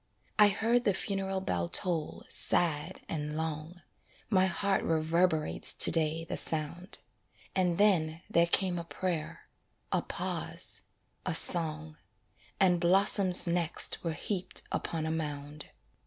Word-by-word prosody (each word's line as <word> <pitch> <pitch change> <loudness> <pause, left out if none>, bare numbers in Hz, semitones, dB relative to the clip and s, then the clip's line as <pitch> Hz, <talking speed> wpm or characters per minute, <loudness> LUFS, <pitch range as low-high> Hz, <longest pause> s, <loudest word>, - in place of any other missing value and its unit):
I 210 - +7
heard 225 +4 0
the 200 -4 0
funeral 195 -1 -4
bell 85 - -3
toll 170 -4 -1
sad 165 +1 -2
and 150 -1 -5
long 160 +2 -6 0.5
My 190 -2 +3
heart 195 +2 -1
reverberates 160 0 0
to - - +6
day 165 0 0
the - - -6
sound 165 +5 -2 0.6
And 180 -2 0
then 170 -5 +1
there 170 -5 +1
came 180 0 -1
a - - -6
prayer 170 -2 -6 0.4
a - - 0
pause - - -3 0.4
a - - -1
song, 155 -2 +7 0.6
And 180 -2 +2
blossoms 185 +1 +2
next 170 -1 -1
were 165 -2 -3
heaped 185 +3 -3
upon 160 -2 -4
a 160 - -3
mound. 150 -2 -6
170 Hz, 125 wpm, -29 LUFS, 155-185 Hz, 0.6 s, I